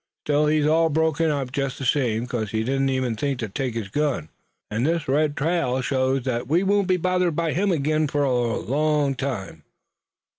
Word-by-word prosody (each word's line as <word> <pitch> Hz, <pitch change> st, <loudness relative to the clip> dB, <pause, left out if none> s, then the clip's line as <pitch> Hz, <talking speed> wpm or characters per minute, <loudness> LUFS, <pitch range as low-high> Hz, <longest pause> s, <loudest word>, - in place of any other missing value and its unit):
Still 150 Hz, 0 st, +2 dB
he's 150 Hz, -1 st, +2 dB
all 160 Hz, +2 st, +3 dB
broke 160 Hz, +1 st, +1 dB
up, 145 Hz, -5 st, 0 dB
jest 135 Hz, 0 st, -2 dB
the 135 Hz, -, -5 dB
same, 120 Hz, -3 st, +1 dB
'cause 120 Hz, -4 st, -3 dB
he 110 Hz, +1 st, -1 dB
didn't 135 Hz, +2 st, 0 dB
even 130 Hz, -3 st, -1 dB
think 140 Hz, +4 st, -1 dB
to 115 Hz, -2 st, -3 dB
take 125 Hz, +3 st, -3 dB
his 110 Hz, -4 st, -4 dB
gun, 140 Hz, -, -1 dB, 0.4 s
an' 110 Hz, +2 st, -1 dB
this 165 Hz, +4 st, 0 dB
red 145 Hz, +2 st, +1 dB
trail 155 Hz, -4 st, 0 dB
shows 130 Hz, 0 st, 0 dB
that 120 Hz, -2 st, -2 dB
we 165 Hz, +7 st, +2 dB
won't 200 Hz, 0 st, +2 dB
be 185 Hz, -1 st, +3 dB
bothered 180 Hz, -1 st, +1 dB
by 165 Hz, -1 st, 0 dB
him 195 Hz, +3 st, +1 dB
ag'in 155 Hz, -1 st, +1 dB
fur 145 Hz, 0 st, 0 dB
a 120 Hz, -4 st, +1 dB
long 150 Hz, +1 st, +1 dB
time." 110 Hz, -, -4 dB
140 Hz, 195 wpm, -23 LUFS, 125-155 Hz, 0.4 s, all